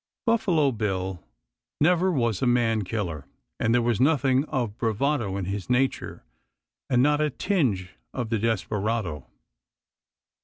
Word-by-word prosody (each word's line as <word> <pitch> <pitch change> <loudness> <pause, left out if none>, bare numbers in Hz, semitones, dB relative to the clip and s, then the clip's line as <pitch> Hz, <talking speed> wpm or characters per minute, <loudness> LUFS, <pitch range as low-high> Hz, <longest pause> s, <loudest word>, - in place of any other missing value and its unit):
Buffalo 180 - +2
Bill 95 -5 -3 0.6
never 180 +4 +3
was 115 - 0
a 130 - +2
man 115 -3 +2
killer, 90 -7 -4 0.3
and 115 - +1
there 120 0 +3
was 120 -1 +1
nothing 135 -1 +3
of 120 -9 -2
bravado 115 -2 0
in 95 - -3
his 100 +2 -4
nature 130 +2 0 0.7
and 125 0 +4
not 150 +1 +3
a 150 - +2
tinge 130 - -1 0.2
of 120 -3 -4
the 115 - +1
desperado. 105 - -1
115 Hz, 130 wpm, -26 LUFS, 100-140 Hz, 0.7 s, and